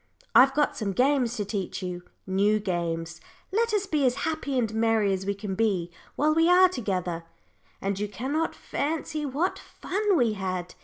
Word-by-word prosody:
I've 270 +2 +7
got 295 0 +2
some 200 -3 -2
games 255 +1 +2
to 205 - -2
teach 195 -1 -4
you 180 -1 -4 0.2
new 200 +3 +2
games. 170 -3 -3 0.3
Let 460 +3 +1
us 415 -2 +1
be 305 -7 0
as 245 - +1
happy 310 -4 -2
and 225 -3 0
merry 220 -3 +2
as 190 0 -3
we 200 - 0
can 200 -1 -5
be 190 -5 0 0.2
while 305 +1 +2
we 325 +2 +4
are 365 +1 +7
together." 185 - -3 0.6
And 195 0 -1
you 210 - -1
cannot 265 +11 -2
fancy 305 0 -3
what 295 +8 -1
fun 405 0 -1
we 235 -5 +2
had. 185 -3 -4
220 Hz, 175 wpm, -27 LUFS, 190-300 Hz, 0.6 s, I've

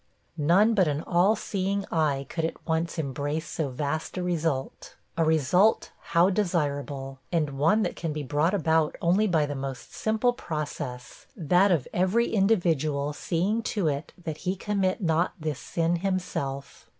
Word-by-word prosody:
None 185 +9 +4
but 190 -5 +3
an 150 +1 -1
all 185 +5 +3
seeing 200 -1 -2
eye 145 -4 +1
could 165 +2 -3
at 160 - -4
once 165 +1 -1
embrace 145 +2 -2
so 155 -4 -2
vast 145 +6 -3
a 180 - -1
result. 160 -6 -2 0.2
A 165 - +2
result, 160 +7 +3 0.2
how 175 +3 +5
desirable! 145 -8 -2
and 155 -4 +1
one 210 +9 +4
that 180 - -2
can 165 -2 -3
be 150 0 -4
brought 150 +7 +1
about 160 -4 +2
only 190 +6 +3
by 160 -5 +2
the 145 - -4
most 135 -2 -6
simple 220 +3 +1
process 145 - -6
that 180 +4 +3
of 160 -8 +1
every 190 +7 +2
individual 160 -9 +1
seeing 185 +9 -1
to 205 -6 -1
it 145 +1 -4
that 160 -4 -6
he 180 +3 -2
commit 195 0 -1
not 165 -1 +1
this 155 -3 -3
sin 170 +1 0
himself. 165 -7 -3
165 Hz, 160 wpm, -27 LUFS, 145-185 Hz, 0.2 s, how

